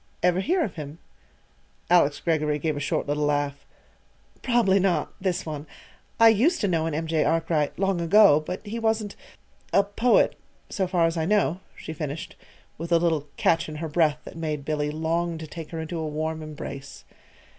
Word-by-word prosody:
"Ever 180 0 +3
hear 335 - +1
of 200 - -5
him?" 150 0 -7 0.9
Alice 170 -5 +4
Greggory 150 -3 0
gave 155 +1 -1
a - - -3
short 145 - -1
little 145 +1 -1
laugh. 145 -1 -1 0.8
"Probably 230 -6 +3
not 190 -2 0
this 185 -1 -1
one. 155 -1 -6 0.5
I 230 0 +8
used 250 - +3
to 205 - +2
know 165 -3 +1
an 160 - -2
M. 160 +2 -2
J. 160 -1 +1
Arkwright, 160 -1 0
long 195 -2 0
ago; 175 -2 +6
but 180 +7 -6
he 220 +3 -4
wasn't 220 -2 0 0.6
a 200 - +5
poet, 225 +5 +2 0.4
so 190 -2 0
far 175 -2 +2
as 165 +1 0
I 160 - 0
know," 195 -2 +2 0.2
she 160 - -7
finished, 150 0 -5 0.4
with 170 +1 -6
a 170 - +6
little 165 -3 0
catch 165 -1 +2
in 155 - -7
her 160 +2 -4
breath 155 -1 +2
that - - -11
made 155 -3 -3
Billy 150 -1 -1
long 165 +2 -1
to 160 - -7
take 160 0 -8
her 165 - -5
into 160 +1 -4
a 160 - -2
warm 155 +1 -3
embrace. 145 -2 -8
165 Hz, 190 wpm, -25 LUFS, 150-185 Hz, 0.9 s, I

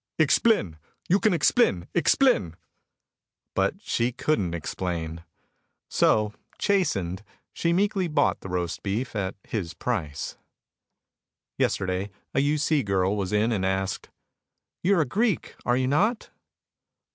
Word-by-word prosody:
"Explin 155 - +3 0.3
you 190 +4 +4
kin 215 0 +3
explin 165 - +3
explin." 160 - +3 1.0
But - - +1
she 120 +2 0
couldn't 115 - 0
explain. 85 -1 -4 0.7
So, 105 -1 +3 0.2
chastened, 105 - 0 0.3
she 170 - 0
meekly 195 +1 +1
bought 150 -3 +1
the 95 - -8
roast 90 -2 -2
beef 110 +6 -3
at 95 -2 -2
his 90 -7 -4
price. 85 - -3 1.2
Yesterday 95 +1 0 0.2
a - - +2
U. 145 +2 +2
C. 150 0 +2
girl 100 -2 +1
was 95 -3 -2
in 105 +3 +2
and 100 -4 0
asked, 95 0 -1 0.7
"You 195 +2 +3
are - - +4
a - - +1
Greek, 210 - 0
are 120 0 +3
you 130 - +1
not?" 205 - +1
110 Hz, 125 wpm, -26 LUFS, -, 1.2 s, you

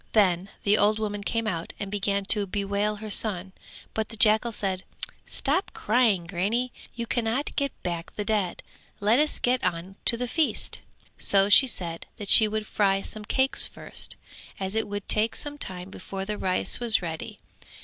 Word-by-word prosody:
Then 190 -3 +2
the 210 +1 +3
old 210 +1 +3
woman 205 -2 -3
came 230 +2 -2
out 170 -6 -4
and 200 -1 -5
began 200 -1 -1
to 205 0 +3
bewail 200 +2 -1
her 215 0 -8
son: 190 -4 0 0.4
but 220 -1 -2
the 225 - -3
jackal 220 +2 +4
said 190 -3 -3 0.4
"Stop 370 - 0
crying, 215 -5 +2
grannie, 205 +8 -1 0.2
you 235 -1 -3
cannot 240 +4 -2
get 280 -2 0
back 170 -1 -4
the 210 - -4
dead: 205 -4 -1 0.4
let 215 +5 +3
us 300 0 +2
get 250 +1 0
on 175 +4 -3
to 235 - +5
the 250 +1 -3
feast." 310 +5 0 0.4
So 195 0 +4
she 265 +6 +8
said 170 -8 -2
that 205 -4 -6
she 220 - +9
would 215 0 -3
fry 195 -2 +1
some 215 -1 -7
cakes 265 +5 +2
first, - - -2 0.4
as 190 0 -3
it 220 0 -1
would 205 0 -6
take 220 +2 +3
some 290 0 -5
time 185 -3 -3
before 190 0 -6
the 210 +1 -3
rice 185 -1 0
was 230 -5 +6
ready. 160 -2 -6
210 Hz, 180 wpm, -26 LUFS, 195-225 Hz, 0.4 s, she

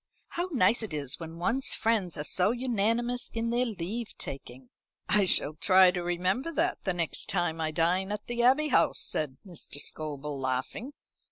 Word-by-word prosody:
How 350 +2 -3
nice 235 - +3
it 205 -8 -4
is 140 0 -1
when 165 0 -8
one's 240 +10 +1
friends 210 -7 0
are 150 - -3
so 180 +5 +1
unanimous 240 0 -1
in 230 0 -1
their 245 +1 +1
leave 215 +3 -5
taking." 130 -2 -7 0.4
"I 205 0 +3
shall 155 -4 +6
try 185 +3 +5
to 180 0 -3
remember 180 - -1
that 345 +4 -1
the 190 - +1
next 170 -2 -3
time 165 -2 -1
I 160 - 0
dine 180 +5 +1
at 210 - -4
the 240 0 -2
Abbey 270 +5 +3
House," - - +3
said 140 -4 -2
Mr. 175 -6 -8
Scobel 145 -1 -5
laughing. 130 - -3
185 Hz, 175 wpm, -28 LUFS, 160-235 Hz, 0.4 s, shall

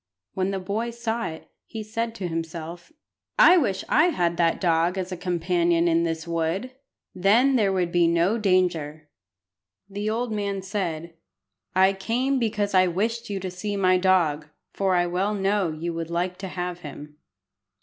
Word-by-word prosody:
When 190 0 -1
the 195 - -2
boy 205 +5 -2
saw 235 0 -3
it, 160 0 -9 0.2
he 220 -1 -6
said 225 +2 -3
to 190 -5 -4
himself 165 - -6 0.5
"I 370 -8 +8
wish 205 - 0
I 305 - +4
had 175 - +1
that 165 -1 +2
dog 170 +1 +1
as 185 0 -3
a - - -2
companion 175 -1 +1
in 170 0 +2
this 165 0 -3
wood. 170 +8 -2 0.4
Then 225 +9 +3
there 210 -5 +3
would 180 -2 0
be 175 -1 +3
no 170 +7 +2
danger." 170 -6 0 0.8
The 205 +2 -3
old 230 +2 -2
man 200 -2 -2
said 170 -5 -3 0.6
"I 190 +1 +5
came 245 +8 0
because 210 -3 -1
I 185 -1 +5
wished 225 +6 -2
you 200 -1 -2
to 185 -1 -4
see 200 +3 -4
my 185 -1 +3
dog, 170 -5 +2 0.3
for 190 -2 +1
I 175 0 +3
well 185 +4 -1
know 195 -2 +1
you 165 +2 -4
would 165 0 -4
like 180 +2 -2
to 195 - -5
have 180 -1 -4
him." 150 -1 -10
185 Hz, 170 wpm, -25 LUFS, 170-210 Hz, 0.8 s, I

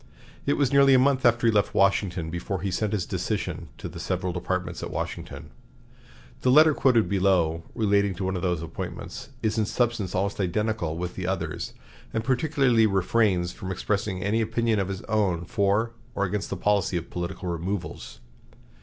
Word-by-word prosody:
It 140 - +4
was 140 -2 +1
nearly 140 -1 +7
a - - +7
month 130 -1 +4
after 120 0 +2
he 115 - +4
left 105 -1 +1
Washington 95 -4 +2
before 85 +1 -3
he 100 0 -2
sent 105 +3 -1
his 100 -5 -1
decision - - -3
to - - -6
the - - -9
several 90 -1 -2
departments 90 -1 -3
at - - -4
Washington. - - -5 0.9
The 130 - +2
letter 155 +4 +7
quoted 125 -6 +3
below, 90 -4 +2
relating 100 -3 +2
to 95 - -4
one 95 0 -1
of 90 - -3
these 90 -3 -1
appointments, 80 0 -6
is 110 0 +1
in 105 - +1
substance 115 -6 0
almost 100 +2 -1
identical 95 -3 -1
with 90 0 -4
the 95 -1 -4
others, 85 -5 -3 0.4
and 110 - 0
particularly 130 -3 +3
refrains 95 -2 +2
from 95 +1 -6
expressing 100 0 -2
any 105 +3 +1
opinion 115 0 +1
of 95 - 0
his 95 -1 -5
own 95 -6 0
for 105 +3 +1 0.2
or 100 - 0
against 100 +1 -3
the 100 - -3
policy 100 -2 +1
of 85 - -6
political 90 +1 -4
removals. 85 -6 -4
100 Hz, 180 wpm, -26 LUFS, 90-115 Hz, 0.9 s, nearly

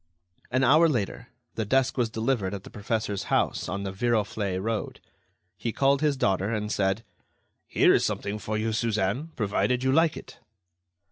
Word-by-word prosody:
An 130 +1 +1
hour 155 +6 +6
later, 120 -2 -2 0.3
the 110 - -2
desk 130 +4 +1
was 120 -3 +1
delivered 110 -3 -1
at 100 - -8
the - - -12
professor's 105 -2 -2
house - - 0
on 100 +1 -3
the 95 - -3
Viroflay 105 -3 0
road. 110 +2 -3 0.6
He 115 - -2
called 140 +3 +2
his 150 -3 +2
daughter, 100 -1 +1
and 105 -1 -2
said: 95 +2 0 0.6
"Here - - +4
is - - +3
something 100 +1 -2
for 110 0 -3
you, 110 +1 -1
Suzanne, 110 +4 0
provided 120 +4 0
you 130 - +2
like 160 +2 +3
it." - - -11
110 Hz, 165 wpm, -27 LUFS, 100-130 Hz, 0.6 s, hour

